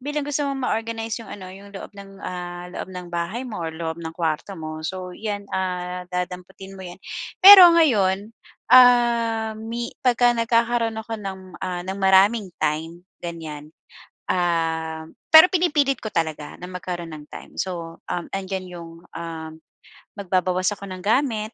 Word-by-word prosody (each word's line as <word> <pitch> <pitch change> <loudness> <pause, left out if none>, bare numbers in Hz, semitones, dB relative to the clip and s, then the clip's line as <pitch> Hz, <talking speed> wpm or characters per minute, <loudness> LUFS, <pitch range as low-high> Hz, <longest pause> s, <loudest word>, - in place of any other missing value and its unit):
bilang 295 +2 -3
gusto 290 0 0
mong 270 -2 -3
ma-organize 225 0 -2
'yong - - -11
ano, 190 -2 -9
'yong 200 +1 -13
loob - - -7
ng, 195 0 -12
ah, 175 0 -6
loob - - -6
ng 180 -1 -7
bahay 170 +9 -2
mo 210 -6 -6
or 160 - -4
loob 160 0 -4
ng 160 -1 -6
kuwarto 165 +3 -2
mo, 155 0 -6
so 185 +1 -4
'yan, 205 -2 -4
ah, 180 -1 -3
dadamputin 180 +2 -5
mo 190 - -8
'yan. 175 +2 -10 0.4
Pero 380 -2 +12
ngayon, 205 - +3 0.4
ah, 235 -3 +5
mi 230 +2 -4 0.2
pagka 245 -1 +4
nagkakaro'n 230 0 +1
ako 225 +1 -9
ng, 195 -2 -6 0.2
ah, 180 -1 -3
ng 190 +1 -4
maraming 195 +2 +4
time 160 +3 -2 0.2
ganyan, 155 -3 -7 0.6
um 160 -2 -1 0.2
pero 315 +3 +11
pinipilit 295 -7 +2
ko 215 - -4
talaga 155 -2 -2
na 180 - -6
magkaro'n 175 -2 -5
ng 150 -1 -9
time. - - -11
So, 170 -3 -4
um, 175 - -2
andiyan 190 -1 -4
'yong, 170 -2 -9 0.3
um, 165 -1 -6 0.7
magbabawas 185 0 0
ako 200 - -9
ng 185 0 -7
gamit, 220 -1 0
190 Hz, 155 wpm, -23 LUFS, 175-225 Hz, 0.7 s, Pero